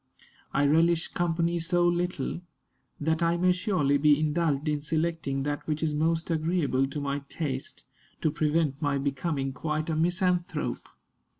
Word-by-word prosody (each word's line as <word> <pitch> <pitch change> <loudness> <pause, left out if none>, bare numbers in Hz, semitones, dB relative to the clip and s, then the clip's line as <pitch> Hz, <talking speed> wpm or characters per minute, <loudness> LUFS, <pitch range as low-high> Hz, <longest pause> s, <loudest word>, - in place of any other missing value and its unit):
I 140 - +2
relish 165 +3 +3
company 170 0 0
so 175 +1 +2
little, 175 -2 -1 0.6
that 160 +2 0
I 170 0 +2
may 180 +1 +3
surely 180 -7 +1
be 150 0 +5
indulged 155 -1 0
in 150 -1 0
selecting 155 -3 -1
that 145 +1 -3
which 155 0 -1
is 155 -2 0
most 165 +2 0
agreeable 155 -5 +1
to 140 +2 -5
my 140 0 -2
taste, 135 -5 -4 0.4
to 155 - +2
prevent 150 -2 0
my 145 -2 +1
becoming 140 0 -2
quite 155 +2 -2
a - - 0
misanthrope." 175 +2 0
155 Hz, 145 wpm, -28 LUFS, 145-170 Hz, 0.6 s, be